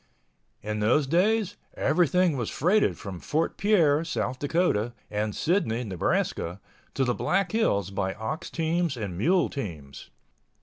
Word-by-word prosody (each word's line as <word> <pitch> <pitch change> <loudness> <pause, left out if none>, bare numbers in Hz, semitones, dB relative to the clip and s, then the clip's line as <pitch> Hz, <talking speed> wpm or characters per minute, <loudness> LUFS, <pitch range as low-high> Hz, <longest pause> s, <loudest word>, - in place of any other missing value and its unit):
In 105 0 -3
those 125 +8 +3
days 200 +7 +1 0.2
everything 180 -1 +2
was 120 -5 -2
freighted 190 +8 +2
from 95 -4 -7
Fort 155 - -1
Pierre, 165 -8 +3
South 130 -5 -3
Dakota, 145 - +1 0.2
and 105 0 -2
Sidney, 155 - 0
Nebraska, 90 -2 -1 0.4
to 135 - +2
the 125 -1 +1
Black 195 +8 0
Hills 100 - +1
by 95 -1 -2
ox 155 - -4
teams 165 -3 -1
and 100 -6 -4
mule 170 - +2
teams. 80 - -7
140 Hz, 135 wpm, -27 LUFS, 105-175 Hz, 0.4 s, those